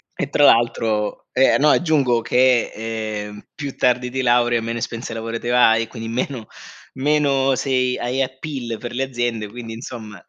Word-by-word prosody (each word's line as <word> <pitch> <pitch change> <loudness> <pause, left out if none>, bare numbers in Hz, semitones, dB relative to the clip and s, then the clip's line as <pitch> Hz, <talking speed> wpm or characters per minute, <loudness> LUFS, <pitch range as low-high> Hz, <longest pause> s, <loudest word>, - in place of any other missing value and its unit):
e - - -3
tra 145 - +4
l'altro 110 -2 +2
e 135 +1 +4
no, 150 +1 +4
aggiungo 140 -9 +2
che, 125 0 +3
ehm, 110 -2 -5
più 140 -3 -6
tardi 125 0 +1
ti 130 +1 -2
laurei, 120 -1 +3
meno 115 +1 -3
esperienza 115 0 -5
lavorativa 115 +2 +2
hai, 115 0 +2
quindi 115 -2 -7
meno 125 - -3 0.5
meno 140 -1 +2
sei 125 -1 0
hai 125 +3 -1
appeal 130 -3 -5
per 120 -1 -7
le 135 +2 -1
aziende, 120 -4 -2
quindi, 115 0 -8
insomma, 110 -3 -9
120 Hz, 155 wpm, -21 LUFS, 115-130 Hz, 0.5 s, tra